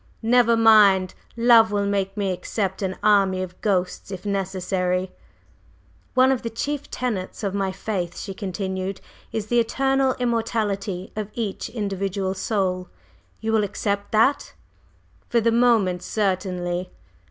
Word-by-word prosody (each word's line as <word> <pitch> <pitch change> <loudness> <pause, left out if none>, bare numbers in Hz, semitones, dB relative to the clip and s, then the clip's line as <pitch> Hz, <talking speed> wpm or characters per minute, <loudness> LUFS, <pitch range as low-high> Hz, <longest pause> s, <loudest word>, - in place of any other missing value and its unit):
"Never 235 0 +4
mind! 205 -5 +6 0.2
Love 230 -2 +6
will 205 -1 0
make 200 0 -1
me 200 -2 0
accept 190 +1 -3
an 190 -1 -2
army 195 -3 +3
of 180 -1 -10
ghosts, 185 -3 -1
if 190 0 -7
necessary." 185 -2 -1 1.0
"One 255 +1 +5
of 260 - 0
the 230 - -3
chief 285 +5 -4
tenets 215 -6 -4
of 195 -2 -1
my 195 -1 -1
faith," 185 -3 -4
she 195 - -5
continued, 190 0 -4 0.3
"is 220 -2 -3
the 240 +2 +2
eternal 270 +2 +1
immortality 215 -6 -1
of 215 -1 -4
each 220 -5 -3
individual 195 -3 -2
Soul. 190 -2 -1 0.5
Will 220 0 +2
you - - +1
accept 200 0 -2
that?" 225 +6 +2 0.8
"For 235 - +3
the 230 +1 +2
moment, 225 -7 +3
certainly!" 185 -3 -2
200 Hz, 135 wpm, -23 LUFS, 190-225 Hz, 1.0 s, mind